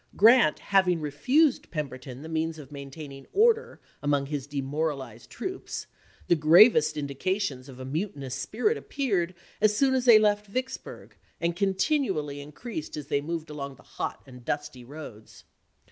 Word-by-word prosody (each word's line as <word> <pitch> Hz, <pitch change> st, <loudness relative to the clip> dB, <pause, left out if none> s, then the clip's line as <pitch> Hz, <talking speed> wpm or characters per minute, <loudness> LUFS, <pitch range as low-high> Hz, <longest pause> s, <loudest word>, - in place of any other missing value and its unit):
Grant 225 Hz, -6 st, +6 dB
having 185 Hz, -3 st, +2 dB
refused 250 Hz, -, +2 dB
Pem 150 Hz, -4 st, -2 dB
berton 130 Hz, +1 st, -10 dB
the -, -, -7 dB
means 160 Hz, 0 st, -2 dB
of 145 Hz, -3 st, -11 dB
maintaining 140 Hz, 0 st, -9 dB
order 455 Hz, +2 st, +3 dB, 0.2 s
among 145 Hz, -1 st, +1 dB
his 140 Hz, -1 st, -4 dB
demoralized 140 Hz, -4 st, -3 dB
troops, 375 Hz, +9 st, -5 dB, 0.4 s
the 175 Hz, -, +4 dB
gravest 175 Hz, +8 st, +6 dB
indications 140 Hz, -1 st, -2 dB
of 130 Hz, -1 st, -11 dB
a 130 Hz, -, -6 dB
mutinous 140 Hz, -3 st, -3 dB
spirit 245 Hz, -, 0 dB
appeared 195 Hz, -11 st, -1 dB, 0.3 s
as 210 Hz, 0 st, +4 dB
soon 270 Hz, +1 st, +3 dB
as 255 Hz, -1 st, +1 dB
they 235 Hz, -3 st, +9 dB
left 210 Hz, -1 st, +2 dB
Vicks 260 Hz, +3 st, -2 dB
burg, -, -, -12 dB, 0.2 s
and 170 Hz, 0 st, 0 dB
continually 190 Hz, -, 0 dB
increased 155 Hz, -, -7 dB
as 145 Hz, -2 st, -7 dB
they 140 Hz, -, +1 dB
moved 160 Hz, +1 st, -4 dB
along 140 Hz, -2 st, -6 dB
the -, -, -19 dB
hot -, -, -5 dB
and 125 Hz, -2 st, -13 dB
dusty 145 Hz, -2 st, -4 dB
roads. 120 Hz, -5 st, -11 dB
155 Hz, 155 wpm, -27 LUFS, 140-210 Hz, 0.4 s, they